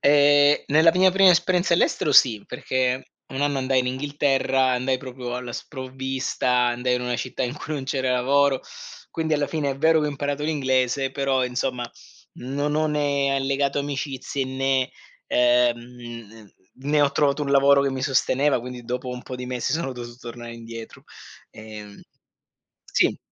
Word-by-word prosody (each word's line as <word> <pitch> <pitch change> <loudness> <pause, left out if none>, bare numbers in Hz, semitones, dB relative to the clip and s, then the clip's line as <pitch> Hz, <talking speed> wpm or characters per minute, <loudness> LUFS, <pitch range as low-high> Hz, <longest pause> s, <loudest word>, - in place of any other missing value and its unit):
Ehm, 145 0 +5
nella 160 +3 +5
mia 185 +1 +5
prima 195 0 +6
esperienza 175 0 +2
all'estero 150 -3 +1
sì, 110 -6 +5
perché 130 0 -1 0.2
un 135 - -5
anno 145 -1 +1
andai 130 0 +1
in 125 - -2
Inghilterra, 135 -1 +1
andai 130 +1 0
proprio 125 -2 -7
alla 125 -1 -5
sprovvista, 130 -1 -4 0.2
andai 125 +1 0
in 125 - -1
una 125 -1 -2
città 130 - -4
in 125 +3 -3
cui 155 - -6
non 135 - -4
c'era 130 -1 -1
lavoro, 135 +2 +2 0.5
quindi 160 -1 -1
alla 145 -1 0
fine 145 -2 -1
è 135 - -4
vero 160 +3 +3
che 150 - 0
ho - - -1
imparato 145 +1 -3
l'inglese, 135 -3 0
però 135 -1 0
insomma 125 -1 -3 0.4
non 145 +3 -3
ho 155 0 +2
né 140 -2 0
allegato 140 +1 0
amicizie 140 -1 -3
né, 130 0 0 0.4
ehm, 125 -1 +3
n 120 -3 -11 0.4
ne 150 0 +3
ho 145 -1 +4
trovato 140 +1 +1
un 140 - -2
lavoro 140 0 +5
che 140 - +1
mi 130 -1 -4
sosteneva 135 0 +2
quindi 125 0 -8
dopo 125 +2 -4
un 125 0 -6
po' 130 - -7
di 125 0 -6
mesi 125 -1 -2
sono 155 -4 -2
dovuto 120 -1 -9
tornare 120 -1 -9
indietro, 115 -1 -10 0.5
ehm 105 -2 -11 0.8
sì. - - +1
135 Hz, 165 wpm, -23 LUFS, 125-145 Hz, 0.8 s, prima